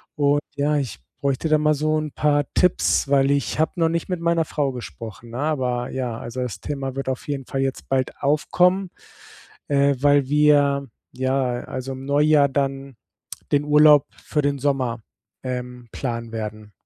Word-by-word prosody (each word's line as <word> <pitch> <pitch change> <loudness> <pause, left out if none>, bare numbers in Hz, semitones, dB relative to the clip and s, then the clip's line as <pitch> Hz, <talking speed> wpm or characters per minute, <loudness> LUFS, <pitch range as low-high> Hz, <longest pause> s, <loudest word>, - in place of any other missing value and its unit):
Und, 145 0 +2
ja, 145 +1 +1
ich 135 -8 -3 0.2
bräuchte 140 +2 0
da 155 - +5
mal 150 0 +3
so 155 +1 0
'n 150 - -5
paar 145 0 +2
Tipps, 180 -5 +2
weil 135 -1 +4
ich 140 +1 -1
habe 160 - +2
noch 165 -1 +3
nicht 170 +2 -2
mit 180 - -2
meiner 170 -1 +2
Frau 145 -3 -1
gesprochen, 115 -2 -9
ne? 120 - -6
Aber, 130 -5 -1
ja 125 -3 -3
also, 120 +2 -5
das 125 -4 -4
Thema 135 -2 -4
wird 135 -1 -4
auf 130 - -4
jeden 140 -3 -3
Fall 135 - -3
jetzt 135 0 -3
bald 130 -1 -1
aufkommen, 180 +6 +2 0.8
äh, 140 -1 +3
weil 145 -1 +3
wir, 145 -2 +3 0.3
ja, 130 -1 -1
also 130 +1 -5
im 130 +1 -8
Neujahr 145 0 +4
dann 135 -1 -2 0.6
den 145 0 +3
Urlaub 150 -1 +6 0.2
für 150 -2 -1
den 140 0 0
Sommer, 130 -4 -1 0.4
ähm, 125 -1 -5
planen 115 -3 -4
werden. 110 -1 -6
140 Hz, 170 wpm, -22 LUFS, 130-150 Hz, 0.8 s, Urlaub